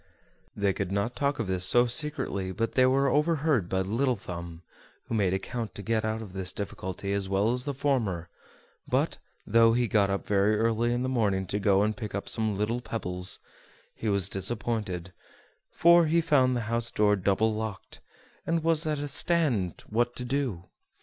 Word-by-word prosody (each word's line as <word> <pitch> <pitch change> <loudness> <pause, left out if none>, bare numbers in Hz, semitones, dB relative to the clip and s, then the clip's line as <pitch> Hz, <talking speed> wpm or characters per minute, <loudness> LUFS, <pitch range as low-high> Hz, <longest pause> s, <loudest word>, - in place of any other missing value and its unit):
They 100 -1 +1
could 95 -1 -3
not 100 +5 -1
talk 140 +2 0
of 115 - -2
this 95 -1 0
so 120 +6 +5
secretly 125 -8 -2
but 115 +3 -2
they 130 -1 +4
were 135 +2 +3
overheard 150 - +1
by 95 0 +1
Little 120 +7 +1
Thumb, 85 -4 -8 0.4
who - - -6
made 100 -5 +2
account 110 +4 -4
to 100 - -7
get 115 0 0
out 110 +1 -2
of 95 -4 -11
this 95 -1 -2
difficulty 100 0 -4
as 100 -1 -2
well 100 +3 +2
as 125 +1 -1
the 145 - -2
former; 115 - 0 0.6
but, - - 0 0.3
though 115 +1 +5
he 120 0 +2
got 105 -2 +2
up 100 0 -2
very 105 +1 +2
early 115 +1 +1
in 120 +1 0
the - - -1
morning 105 -7 +1
to 100 +3 -2
go 100 -1 +3
and 110 +1 0
pick 110 -5 -6
up 100 - -4
some 110 -2 0
little 110 +4 -1
pebbles, 90 -6 -2 0.6
he 110 - -3
was 100 -2 +1
disappointed, 95 -3 -3 0.6
for 170 -1 +5
he 165 +2 +3
found 135 -6 +3
the - - -1
house 115 +1 -1
door 105 -1 +3
double 100 +3 +1
locked, 110 -2 -6 0.4
and 165 -1 0
was 165 -1 +2
at 155 -1 0
a 145 +1 -3
stand 140 - 0
what 120 +2 0
to 125 - -5
do. 125 -9 -2
110 Hz, 190 wpm, -28 LUFS, 100-125 Hz, 0.6 s, so